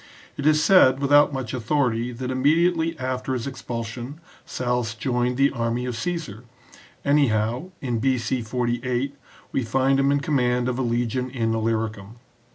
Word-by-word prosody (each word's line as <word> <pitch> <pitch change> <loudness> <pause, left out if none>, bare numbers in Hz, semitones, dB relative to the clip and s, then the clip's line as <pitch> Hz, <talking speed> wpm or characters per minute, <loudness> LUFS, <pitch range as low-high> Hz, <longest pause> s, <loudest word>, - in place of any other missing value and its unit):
It 145 - -1
is 155 0 +4
said, 150 -7 +6
without 145 +1 +5
much 130 -4 -4
authority, 125 -1 0
that 125 +1 -5
immediately 165 +5 +2
after 130 0 -3
his 125 -3 -3
expulsion 120 +1 -6 0.3
Sallust 120 -3 -2
joined 125 0 0
the 140 +1 +4
army 120 -1 -2
of 125 -2 -3
Caesar; 160 - -4 0.6
anyhow, 130 0 +1
in 120 -4 -1
B.C. 125 0 0
48, 125 +3 -2 0.4
we - - 0
find 135 +3 +1
him 135 +1 +3
in 145 - +2
command 125 -4 +1
of 125 0 -2
a - - +1
legion 120 +1 -1
in 115 -3 -1
Illyricum. 110 -2 -2
125 Hz, 150 wpm, -24 LUFS, 115-140 Hz, 0.6 s, said